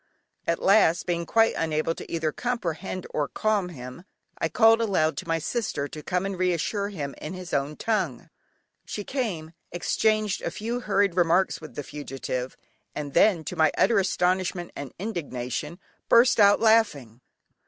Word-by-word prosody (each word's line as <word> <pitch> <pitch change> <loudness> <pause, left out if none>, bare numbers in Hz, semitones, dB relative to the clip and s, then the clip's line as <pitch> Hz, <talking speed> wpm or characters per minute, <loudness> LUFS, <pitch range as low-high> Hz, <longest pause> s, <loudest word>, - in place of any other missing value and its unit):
At 170 - +1
last, 190 -4 +4
being 170 -2 -2
quite 225 0 +4
unable 160 0 0
to - - -10
either 160 -2 0
comprehend 185 -5 -3
or 145 -2 -1
calm 210 -1 0
him, 125 0 -9 0.4
I 165 - 0
called 225 +5 +5
aloud 185 -8 +1
to 185 - -5
my 165 0 +1
sister 165 -4 -2
to 150 +2 -9
come 180 +3 -1
and 195 -2 -4
reassure 185 +3 0
him 145 -9 -5
in 165 +5 -6
his 185 -1 -8
own 140 +2 0
tongue. 185 - -2 0.6
She 205 - -5
came, 195 - -3 0.2
exchanged 215 +3 +1
a - - -2
few 230 +3 -3
hurried 200 -5 +1
remarks 175 +1 +2
with 155 - -11
the 145 - -4
fugitive, 135 -3 -5 0.4
and 145 -2 -5
then, 185 -7 +4
to - - -5
my 160 - +4
utter 220 +1 +4
astonishment 185 -1 0
and 140 -2 -6
indignation, 150 - -4 0.3
burst 235 0 +5
out 205 -1 +6
laughing. 205 - +2
180 Hz, 160 wpm, -26 LUFS, 155-210 Hz, 0.6 s, out